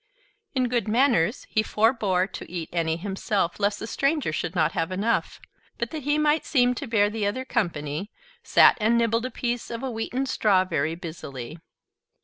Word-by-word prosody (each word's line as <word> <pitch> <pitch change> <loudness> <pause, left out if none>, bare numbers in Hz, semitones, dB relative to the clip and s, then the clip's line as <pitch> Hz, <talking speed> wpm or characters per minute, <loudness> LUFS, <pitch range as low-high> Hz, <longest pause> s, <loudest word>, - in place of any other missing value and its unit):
In 255 -1 +2
good 240 -4 -1
manners, 235 - +2
he 215 - +1
forbore 215 -4 +2
to - - -8
eat 170 -3 -4
any 165 -2 0
himself, 195 0 -2
lest 205 0 +1
the - - -6
stranger 275 - 0
should 165 +2 -3
not 160 -2 +2
have 165 +1 -2
enough; 205 +5 -1 0.4
but 235 0 -3
that 315 - -4
he 290 +2 +1
might 305 +1 +2
seem 250 -3 +3
to 255 +3 -6
bear 215 -3 +3
the 210 -1 -2
other 255 +6 -3
company, 170 - -2 0.3
sat - - +5
and 225 +2 +3
nibbled 230 +1 +1
a - - -7
piece 240 -2 -3
of 230 +2 -5
a 265 - -2
wheaten 240 +4 -2
straw 200 -7 +2
very 160 -2 -1
busily. 160 -5 -8
215 Hz, 180 wpm, -25 LUFS, 175-245 Hz, 0.4 s, sat